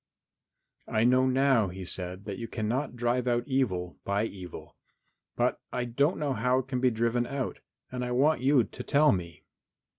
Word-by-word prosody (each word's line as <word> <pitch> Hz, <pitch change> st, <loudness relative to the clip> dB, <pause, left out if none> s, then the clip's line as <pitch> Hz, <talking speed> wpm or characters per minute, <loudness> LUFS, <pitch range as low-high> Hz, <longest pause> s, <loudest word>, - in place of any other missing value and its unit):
"I 110 Hz, -, +1 dB
know 130 Hz, +2 st, +4 dB
now," 130 Hz, -4 st, +3 dB
he 95 Hz, +1 st, -7 dB
said, 90 Hz, +2 st, -4 dB
"that 100 Hz, -2 st, -5 dB
you 115 Hz, -, -4 dB
cannot 125 Hz, +5 st, -2 dB
drive 120 Hz, +1 st, 0 dB
out 120 Hz, -1 st, +2 dB
evil 105 Hz, -11 st, -1 dB
by 100 Hz, +2 st, 0 dB
evil, 90 Hz, -5 st, -9 dB, 0.6 s
but -, -, 0 dB
I 125 Hz, -, -1 dB
don't 140 Hz, +8 st, +1 dB
know 145 Hz, -3 st, -1 dB
how 125 Hz, +2 st, +1 dB
it 130 Hz, -1 st, -2 dB
can 130 Hz, -2 st, -2 dB
be 130 Hz, 0 st, +4 dB
driven 120 Hz, +1 st, 0 dB
out 140 Hz, -2 st, -3 dB, 0.3 s
and 125 Hz, 0 st, -3 dB
I 125 Hz, -, -2 dB
want 135 Hz, +4 st, +3 dB
you 135 Hz, -1 st, +4 dB
to -, -, -8 dB
tell 150 Hz, +1 st, +4 dB
me." 85 Hz, -3 st, -4 dB
120 Hz, 180 wpm, -29 LUFS, 105-130 Hz, 0.6 s, know